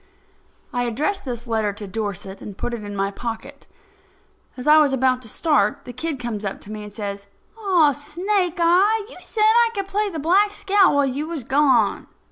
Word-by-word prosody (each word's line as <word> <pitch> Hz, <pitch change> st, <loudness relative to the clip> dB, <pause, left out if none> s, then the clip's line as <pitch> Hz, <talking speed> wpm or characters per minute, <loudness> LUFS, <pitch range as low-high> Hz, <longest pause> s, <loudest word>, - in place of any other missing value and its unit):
I 245 Hz, 0 st, 0 dB
addressed 305 Hz, -, -2 dB
this 240 Hz, -2 st, -5 dB
letter 220 Hz, -3 st, 0 dB
to 205 Hz, 0 st, -7 dB
Dorset, 200 Hz, -2 st, -5 dB
and 200 Hz, -2 st, -9 dB
put 240 Hz, -, -3 dB
it 230 Hz, -3 st, -5 dB
in 205 Hz, 0 st, -6 dB
my 195 Hz, 0 st, -1 dB
pocket. 240 Hz, +6 st, -7 dB, 0.9 s
As 250 Hz, -, -7 dB
I 305 Hz, +1 st, +7 dB
was 290 Hz, -3 st, +3 dB
about 260 Hz, -1 st, +2 dB
to 225 Hz, -, -9 dB
start, 310 Hz, +6 st, +1 dB
the 245 Hz, -, -8 dB
kid 295 Hz, +2 st, -3 dB
comes 235 Hz, -4 st, -4 dB
up 195 Hz, -1 st, -4 dB
to 205 Hz, -, -11 dB
me 215 Hz, 0 st, -6 dB
and 210 Hz, 0 st, -9 dB
says: 200 Hz, -1 st, -6 dB, 0.3 s
"Aw, 370 Hz, -9 st, +3 dB
Snake 355 Hz, +6 st, -1 dB
eye, 390 Hz, +6 st, +3 dB
you -, -, -11 dB
said 430 Hz, -, -2 dB
I 460 Hz, +2 st, +5 dB
could 395 Hz, -1 st, -2 dB
play 410 Hz, +2 st, -1 dB
the 335 Hz, -, -6 dB
Black 365 Hz, +7 st, +3 dB
Scout 395 Hz, -5 st, +3 dB
while 285 Hz, -1 st, +3 dB
you 275 Hz, +4 st, -3 dB
was 325 Hz, -6 st, -5 dB
gone." 265 Hz, -5 st, +2 dB
275 Hz, 200 wpm, -22 LUFS, 220-355 Hz, 0.9 s, I